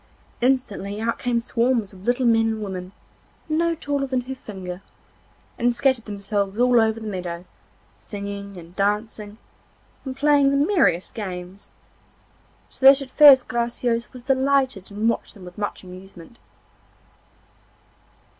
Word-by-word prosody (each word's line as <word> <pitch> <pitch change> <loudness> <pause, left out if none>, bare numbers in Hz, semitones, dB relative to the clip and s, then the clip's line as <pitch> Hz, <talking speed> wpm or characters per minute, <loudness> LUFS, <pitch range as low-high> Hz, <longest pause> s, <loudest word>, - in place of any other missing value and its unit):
Instantly 225 -6 0
out 230 +1 -2
came 245 -1 0
swarms 230 -3 0
of 190 +1 -14
little 245 +1 +1
men 225 -1 +4
and 220 -1 -2
women, 185 -2 -6 0.6
no 335 +2 +1
taller 285 -2 -2
than 260 -1 -1
her 255 +2 -6
finger, 190 -7 -8 0.8
and 240 0 +2
scattered 260 -3 +1
themselves 200 0 -3
all 245 -1 +5
over 220 0 +1
the 220 - -9
meadow, 180 -4 -5 0.5
singing 200 -1 -7
and 170 +1 -12
dancing, 210 +1 -2 0.7
and 265 -1 -6
playing 285 -1 +4
the 280 - +1
merriest 280 - +2
games, 185 -2 -7 1.0
so - - -13
that 270 +1 +9
at 260 - -13
first 275 -4 +8
Graciosa 235 0 -1
was 250 -1 -12
delighted 265 -5 +1
and 210 +2 -2
watched 230 - -2
them 190 -3 -12
with 180 +2 -11
much 205 -1 -4
amusement. 185 +2 -13
225 Hz, 135 wpm, -23 LUFS, 200-260 Hz, 1.0 s, that